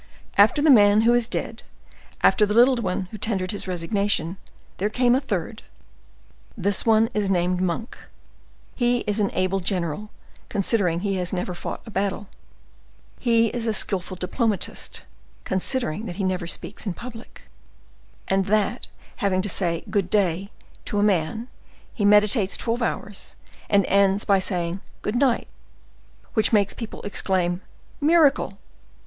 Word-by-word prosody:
After 215 +8 +5
the 310 - +6
great - - +9
man 205 +1 +5
who 235 +2 +4
is 240 -1 +2
dead, - - -4 0.6
after 215 - +5
the 210 0 +1
little 250 +2 +6
one 190 -6 -1
who 215 - -8
tendered 190 -4 -1
his 205 - -5
resignation, 185 0 -1 0.4
there 205 +3 0
came 245 +2 +2
a 260 - +2
third. 215 - -4 1.0
This 200 +2 +1
one 225 0 +5
is 210 -2 0
named 180 -1 +1
Monk; 185 +5 -2 0.8
he 245 -1 +1
is 210 0 -1
an 200 -2 +2
able 185 +1 +1
general, 180 +1 -2 0.4
considering 195 -4 +1
he 195 -1 -1
has 180 -1 -2
never 180 -1 -3
fought 175 - -6
a 225 - -10
battle; 200 +1 -2 0.9
he 230 -2 +3
is 235 0 -4
a 220 - +1
skillful 185 -2 +1
diplomatist, 205 +3 -2 0.4
considering 210 - 0
that 175 - -6
he 195 - -3
never 185 -2 -1
speaks 205 +5 -5
in 185 - -2
public, 235 -1 -11 0.8
and 195 0 +1
that 215 +4 0 0.3
having 185 -2 0
to 205 - -2
say 170 -3 -1
'good 200 -4 -1
day' 195 -2 +1 0.4
to 205 - -3
a 205 - +3
man, 205 +3 0 0.5
he 210 - -1
meditates 210 0 +4
twelve 235 +1 -1
hours, 205 -3 -4 0.3
and 200 -2 +4
ends 200 0 +2
by 195 -1 +4
saying 180 -1 -2 0.2
'good 210 - -1
night;' 250 -1 +2 0.9
which 220 - +2
makes 205 -3 +3
people 230 -2 -8
exclaim 185 -3 -1 0.4
'miracle! 295 -9 +3
205 Hz, 150 wpm, -24 LUFS, 185-225 Hz, 1.0 s, great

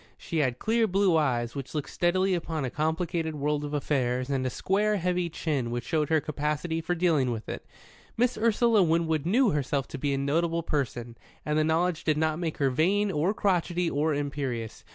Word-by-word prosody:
She 165 - -5
had 130 -5 +1
clear 225 - +1
blue 195 -2 +3
eyes 120 -7 +1
which 140 +1 -7
looked 150 - -3
steadily 185 +2 +1
upon 160 -4 -2
a 125 - -4
complicated 160 +1 -1
world 150 0 -1
of 145 0 -3
affairs, 130 -2 0
and 135 -2 0
a 130 - 0
square, 205 +9 +1
heavy 180 -1 0
chin 145 -7 -2
which 120 0 -3
showed 155 -1 0
her 160 -1 +4
capacity 150 +3 -2
for 175 +2 -1
dealing 165 -7 +2
with 115 -2 -4
it. - - -6 0.5
Miss 245 +1 +2
Ursula 225 0 +3
Winwood 160 -2 +1
knew 235 +4 +4
herself 140 -2 -1
to 140 - -6
be 145 +1 0
a - - -2
notable 165 +4 0
person, 120 -6 -3 0.3
and 150 - 0
the 155 - +3
knowledge 165 +1 +1
did 155 -2 +1
not 155 +1 0
make 165 -3 -3
her 135 -2 +2
vain 195 +9 +2
or 160 +4 +1
crotchety 180 -4 0
or 150 +1 +1
imperious. 140 -6 -4
155 Hz, 195 wpm, -27 LUFS, 140-175 Hz, 0.5 s, her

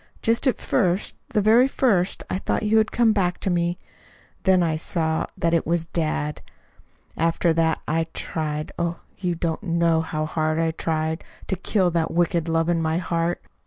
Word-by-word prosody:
Just 230 +4 +2
at 260 - +1
first, 185 -4 0 0.2
the 215 -5 +1
very 230 +5 +6
first, 200 -9 +1
I 185 - -2
thought - - -1
you 215 +1 +4
had 215 - +1
come 230 -2 +3
back 180 -4 0
to 190 - 0
me. 175 0 0 0.7
Then 185 -2 +5
I 160 -2 +1
saw 160 0 -1
that 170 0 +1
it 165 - +1
was 170 0 +1
dad. 155 -2 -2 0.7
After 165 +1 +2
that 160 0 +1
I 160 +1 0
tried 155 -1 -3
oh, 170 0 -2 0.2
you 180 -3 -1
don't 165 -1 -2
know 170 -3 +2
how 155 -1 -3
hard 155 0 -1
I 165 0 +1
tried 160 0 -2 0.2
to - - -1
kill 185 0 +1
that 165 -1 0
wicked 170 -1 +1
love 165 0 +1
in 170 -1 +1
my 160 0 0
heart. 170 0 -1
170 Hz, 180 wpm, -24 LUFS, 160-185 Hz, 0.7 s, very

